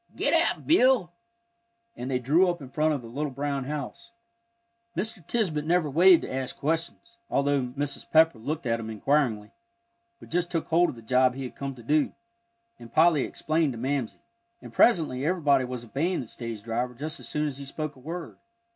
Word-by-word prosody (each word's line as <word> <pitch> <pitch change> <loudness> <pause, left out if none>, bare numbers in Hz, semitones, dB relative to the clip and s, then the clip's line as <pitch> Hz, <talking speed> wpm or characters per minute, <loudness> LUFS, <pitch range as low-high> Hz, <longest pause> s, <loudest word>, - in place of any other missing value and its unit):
Git - - +1
ap, - - +2
Bill!" 255 - +4 0.8
and 125 - -5
they 130 - +1
drew 155 +9 +3
up 175 0 -2
in 135 -3 -10
front 155 +1 +1
of 130 - -6
the - - -9
little 145 +6 -3
brown 140 0 -3
house. 150 - -6 0.8
Mr. 195 -1 -3
Tisbett 175 -11 0
never 165 -2 +1
waited 175 +3 +7
to - - -5
ask 130 -1 -4
questions, 165 +9 -3
although 140 0 +2 0.2
Mrs. 145 0 -3
Pepper 160 -6 +4
looked 150 +6 -4
at 115 -1 0
him 110 -1 -6
inquiringly, 110 -2 0 0.7
but - - -14
just 175 0 0
took 165 -3 -3
hold 170 +2 +4
of - - -6
the 115 - -13
job 125 +2 +3
he 135 - -5
had 125 - -7
come 140 -1 -5
to 120 - -13
do, 150 +5 +1 0.7
and 115 -1 -12
Polly 160 -1 +4
explained 155 -3 0
to - - -8
Mamsie. 130 0 -2 0.4
And - - -12
presently 155 - +3
everybody 145 -5 +2
was 125 -1 -6
obeying 165 +10 -1
the 120 - -8
stage 115 -2 -7
driver 120 +2 -2
just 155 +5 -5
as - - -8
soon 150 0 -1
as 140 -2 -4
he 140 - -7
spoke 155 +1 -5
a - - -16
word. 165 +5 -7
145 Hz, 195 wpm, -27 LUFS, 125-165 Hz, 0.8 s, waited